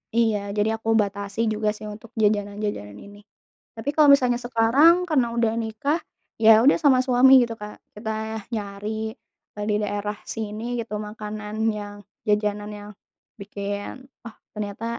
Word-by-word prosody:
Iya, 225 -2 +3 0.2
jadi 210 +1 +1
aku 225 - -10
batasi 200 0 -5
juga 215 0 0
sih 215 - -11
untuk 220 +1 -13
jajanan-jajanan 205 - -1
ini. 205 - -13 0.6
Tapi 225 +5 -4
kalau 305 -2 +6
misalnya 250 -3 +3
sekarang 265 +10 +4
karena 260 -6 +2
udah 230 -2 +1
nikah, 225 +9 -1 0.4
ya 220 0 +8
udah 280 - +5
sama 265 -3 +5
suami 255 +1 +5
gitu 235 - -3
Kak 210 0 -7 0.2
kita 220 +1 -4 0.4
nyari, 200 -1 -4 0.7
eee, 210 - -4
di 210 - +2
daerah 205 0 -3 0.2
sini 215 0 -5 0.2
gitu 225 -2 -6
makanan 210 0 -7 0.2
yang, 205 -1 -7 0.3
jajanan 210 0 0
yang 205 0 -10 0.5
bikin, 205 +6 -6 0.2
"Oh 225 - -10 0.2
ternyata 210 +1 -5
215 Hz, 145 wpm, -24 LUFS, 205-230 Hz, 0.7 s, ya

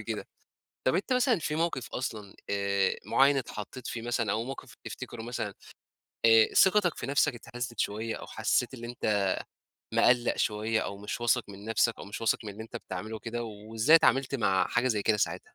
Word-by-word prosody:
كده. - - -5 0.6
طَب - - +3
أنت 260 - 0
مثلًا 250 -4 +3
في 150 -1 -2
موقف 160 -6 -1
أصلًا 105 -6 -5
آآ 100 -1 +1
معيّن 140 +1 +4
اتحطّيت 125 0 -6
فيه 115 - -4
مثلًا 115 -3 -1
أو 110 +2 0
موقف 130 -2 -8
تفتكره 120 -2 -7
مثلًا 115 -3 -4 0.7
آآ 115 -1 +6
ثقتَك 190 -3 +5
في - - -5
نَفْسك 140 -2 +2
اتهزّت 120 -1 -6
شوية 110 +2 -1
أو - - -9
حسّيت 120 +3 0
اللي 120 -2 -7
أنت 105 -4 0 0.7
مِقلَّق 120 -1 +4
شوية 110 +1 0
أو 100 - -5
مش 105 +4 -5
واثق 120 +1 +2
من 100 0 -10
نَفْسك 115 +1 +2
أو - - -7
مش 100 - -7
واثق 115 - +2
من 105 - -5
اللي 105 +3 -8
أنت 115 +2 -8
بتعمله 110 -1 -6
كده 120 +2 -4
وإزاي 110 +7 +3
اتعاملت 135 -4 +3
مع 100 -7 +2
حاجة 120 +2 +1
زي 110 -4 0
كده 110 +1 +3
ساعتها؟ 105 - 0
115 Hz, 185 wpm, -29 LUFS, 105-125 Hz, 0.7 s, آآ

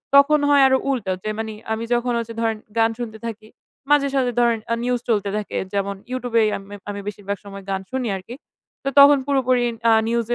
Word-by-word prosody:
তখন 290 +2 +6
হয় 285 -1 +6
আরও 265 0 +4
উল্টো 235 -8 -1
যে, 215 - -2
মানে 220 -1 -4 0.2
আমি 220 +1 -3
যখন 240 +1 +1
হচ্ছে 230 0 -4
ধরেন 225 -1 0 0.2
গান 225 0 +4
শুনতে 225 -2 -5
থাকি, 220 -1 -7 0.4
মাঝে 290 -1 +5
সাঝে 255 -2 +2
ধরেন 235 -2 +3
আ - - +2
news 250 0 +1
চলতে 205 -3 +1
থাকে। 210 - -4 0.2
যেমন 200 0 -1 0.2
YouTube 250 -2 -4
এই - - +3
আম 195 - -11 0.3
আমি 205 0 -4
বেশিরভাগ 200 -1 -4
সময় 200 -1 -9
গান 190 -1 -1
শুনি 260 -2 -2
আরকি। 190 +6 -9 0.5
তো 275 - 0
তখন 285 +1 +9
পুরোপুরি 255 -3 +2 0.3
আ - - +6 0.2
news 235 -1 0
230 Hz, 205 wpm, -22 LUFS, 210-255 Hz, 0.5 s, তখন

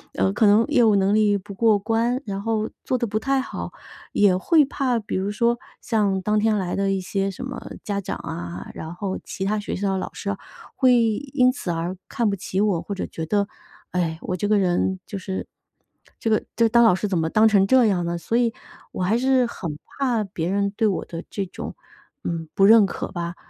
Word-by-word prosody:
呃， 95 +1 +1
可 220 - +3
能 210 +2 +5
业 245 - +4
务 215 -2 +5
能 195 +1 +3
力 210 -1 +3
不 200 +1 -9
过 215 +1 +3
关， 230 +4 0
然 200 -2 -4
后 220 0 -1
做 255 - 0
得 235 -1 -1
不 215 +1 -1
太 270 +4 +1
好。 260 - -5 0.4
也 200 -3 +4
会 300 - +4
怕， 265 -4 0
比 210 - -5
如 195 +2 -1
说 235 +3 +1 0.2
像 205 -4 +1
当 210 +3 +1
天 215 0 +2
来 185 -3 -2
的 195 0 +1
一 195 - 0
些 195 +1 -2
什 255 +7 -7
么 260 - -7
家 200 -1 -2
长 195 - -4
啊， 170 +1 -6
然 160 +1 -7
后 190 +1 -3
其 190 - -5
他 210 +2 +1
学 205 - -4
校 195 0 -1
的 - - 0
老 185 - -5
师 200 - -5
啊 195 - -4 0.4
会 255 -2 +5
因 250 +3 +2
此 255 -9 -4
而 170 +2 -2
看 235 -3 0
不 200 - 0
起 190 0 -3
我， 200 -5 +2
或 200 - -5
者 - - -3
觉 160 - -6
得， 200 +4 +1 0.4
唉， 170 -3 -1
我 180 - -3
这 195 +3 -1
个 210 0 +3
人 190 0 +1
就 205 - -6
是 190 0 -4 0.7
这 225 - -1
个 215 - +2
这 230 - +4
个 - - +3
当 235 +1 +5
老 225 -6 +6
师 210 - -2
怎 190 -3 0
么 160 0 0
当 215 +5 +5
成 200 -3 +4
这 255 +2 +5
样 190 -5 +2
呢？ 170 0 -2
所 225 +7 -1
以 235 -2 +2 0.4
我 185 - -3
还 205 +5 +2
是 260 0 +3
很 170 -10 -5 0.2
怕 245 -5 +1
别 175 -4 -3
人 200 +1 +1
对 220 - +2
我 195 - -1
的 165 0 -7
这 200 - -3
种， 180 - -7 0.5
嗯， 165 -2 -3
不 195 - +5
认 220 0 +8
可 195 - -5
吧。 175 -2 -4
205 Hz, 250 characters per minute, -23 LUFS, 185-225 Hz, 0.7 s, 认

